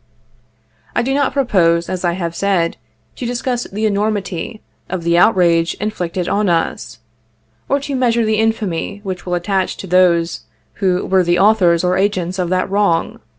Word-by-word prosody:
I - - +2
do 265 +2 -1
not 280 -1 +1
propose, 180 -11 +2
as 185 -1 -4
I 175 -1 +1
have 170 -2 -3
said, 185 -4 0 0.4
to 250 - -5
discuss 245 0 -2
the 215 +3 -3
enormity 205 -1 -2 0.3
of 185 -3 -3
the 170 0 +2
outrage 170 -3 +3
inflicted 180 -4 -3
on 205 -1 +1
us, 165 -8 -1 0.7
or 280 - +2
to 280 0 -5
measure 235 -3 +2
the 215 0 +1
infamy 205 -3 -1
which 185 -3 -6
will 180 - 0
attach 185 +1 -1
to - - -7
those 175 -2 +2 0.4
who 185 -2 +1
were 190 -1 +3
the 175 0 +2
authors 190 -4 +4
or 180 +1 +1
agents 185 -2 -1
of 180 -2 -1
that 185 0 0
wrong. 195 -4 0
185 Hz, 165 wpm, -17 LUFS, 175-215 Hz, 0.7 s, authors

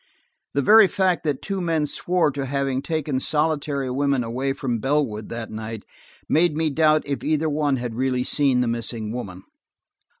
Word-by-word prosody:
The 140 - +2
very 215 +5 +7
fact 190 -2 +1
that 145 -3 -1
two 195 -2 -3
men 165 -3 0
swore 175 +1 0
to 140 0 -4
having 135 -1 -1
taken 150 -3 -2
solitary 145 -3 0
women 140 -1 +1
away 125 +4 -2
from 130 -4 -2
Bellwood 130 -5 -1
that 115 -1 -6
night, 110 0 -6 0.4
made 165 -1 +3
me 160 -1 +1
doubt 155 +1 +3
if 140 -1 -3
either 155 +1 +1
one 145 -2 +1
had 120 -2 -4
really 125 +1 0
seen 135 -2 +2
the 125 - 0
missing 115 -2 -3
woman. 95 -7 -6
140 Hz, 170 wpm, -23 LUFS, 125-155 Hz, 0.4 s, very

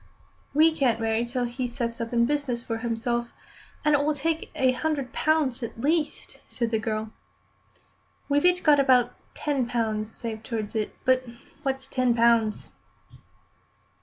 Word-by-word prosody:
"We 315 +1 +5
can't 245 -6 +2
marry 225 +1 0
till 245 +1 -2
he 245 +1 -2
sets 235 -1 -3
up 230 - -4
in 235 -1 +3
business 260 -4 -1
for 225 -2 -3
himself, 235 +1 -1 0.6
and 300 - +4
it 285 -1 +3
will 300 +1 +1
take 320 +3 -2
a 260 -1 +3
hundred 275 -1 -2
pounds 300 -5 +1
at 230 -1 -6
least," 300 +4 -1
said 235 -2 -2
the 220 - +1
girl. 215 0 -3 1.2
"We've 290 +3 +2
each 360 0 +4
got 295 -2 +6
about 255 -3 +4 0.2
ten 275 -5 -1
pounds 220 -3 -1
saved 225 -2 -6
towards 220 -3 -4
it. 215 -2 -2
But 255 0 +4 0.4
what's 270 -2 -2
ten 255 -2 +1
pounds?" 230 -2 +2
245 Hz, 155 wpm, -26 LUFS, 230-285 Hz, 1.2 s, got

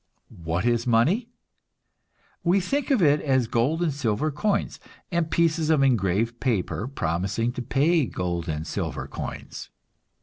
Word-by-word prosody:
What 85 +5 -1
is 120 0 +1
money? 155 - +2 1.1
We 180 +3 +3
think 275 +11 -1
of 255 -10 +3
it 145 -1 +4
as 130 -4 +2
gold 130 +10 0
and 160 -4 0
silver 135 +2 -1
coins, 200 +8 -1 0.3
and 170 -2 0
pieces 160 -2 +1
of 155 -3 +4
engraved 115 -1 +1
paper 110 -2 -1
promising 100 +1 -1
to 125 - -5
pay 145 +4 +2
gold 85 -3 -3
and 75 0 -3
silver - - -4
coins. - - -7
130 Hz, 140 wpm, -25 LUFS, 105-160 Hz, 1.1 s, it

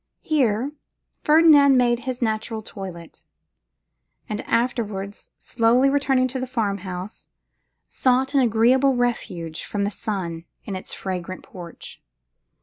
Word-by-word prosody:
Here 260 -4 +1 0.5
Ferdinand 300 -3 +6
made 240 -1 +3
his 255 -1 -3
natural 220 0 -2
toilet; 180 -5 -9 1.0
and 210 0 -3
afterwards 210 -5 -2
slowly 240 +4 +2
returning 270 -2 +2
to 260 +1 -4
the 255 - -3
farm 215 -6 -1
house, 185 +2 -7 0.6
sought 260 +2 +1
an 280 - +4
agreeable 255 +3 +3
refuge 180 -10 -2
from 205 -1 -3
the 200 - -1
sun 185 -7 -4 0.2
in 200 - -4
its 185 - -7
fragrant 185 -1 -5
porch. 175 -3 -11
230 Hz, 120 wpm, -23 LUFS, 195-255 Hz, 1.0 s, Ferdinand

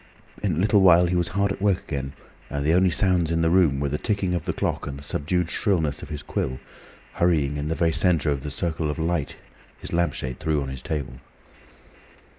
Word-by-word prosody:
In 100 -4 0
a - - -3
little 100 +2 +3
while 90 -2 +6
he 90 +1 0
was 85 -1 +1
hard 100 +2 0
at 100 - -5
work 100 -2 +1
again, 70 -2 -4 0.4
and 70 0 -3
the 80 - +3
only 90 +1 +4
sounds 90 -2 +2
in 85 0 +1
the 80 - +2
room 85 -7 +3
were 70 0 -1
the 75 - -2
ticking 100 -5 -1
of 90 - 0
the - - 0
clock - - -2
and 70 -1 -5
the 70 - -11
subdued 85 +4 -1
shrillness 80 -9 0
of - - -9
his 75 - -6
quill, 65 0 -3 0.5
hurrying 75 -5 +1
in 75 0 -3
the 80 - -1
very 85 0 +2
centre 80 -1 +2
of 70 -2 -2
the 75 - -5
circle 80 +1 -2
of 75 - -3
light 80 -2 -1 0.4
his - - -8
lampshade 85 -7 -1
threw 80 -2 0
on 70 -1 -4
his 65 -1 -6
table. 65 -4 -4
80 Hz, 225 wpm, -24 LUFS, 70-90 Hz, 0.5 s, while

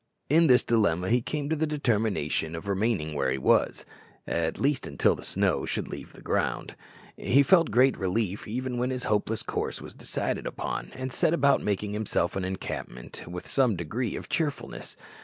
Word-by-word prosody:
In 165 +3 +5
this 125 -2 +6
dilemma 95 -5 +2
he 120 +1 +4
came 145 +4 -3
to 160 - +1
the 160 +1 0
determination 110 - 0
of 80 +4 -7
remaining 100 -6 0
where 70 -3 0
he 65 - 0
was, 65 - +2 0.4
at 85 -1 -1
least 140 -1 +1
until 70 - +3
the - - -8
snow - - +1
should - - -2
leave - - -8
the - - -14
ground. - - -1 0.4
He 140 +3 +4
felt 170 +2 +5
great 130 +2 +4
relief 95 +1 -1
even 125 +2 -3
when 125 +1 0
this 130 -1 -3
hopeless 105 +1 0
course - - -3
was - - -9
decided - - -2
upon, - - -4
and 130 -1 -4
set 165 - +2
about 140 -2 +4
making 105 0 -1
himself 105 -4 0
an 95 - -1
encampment 80 -10 -6
with 90 +1 -7
some 125 -6 +3
degree 100 +8 -3
of - - -6
cheerfulness. 155 -5 -3
110 Hz, 180 wpm, -28 LUFS, 90-130 Hz, 0.4 s, this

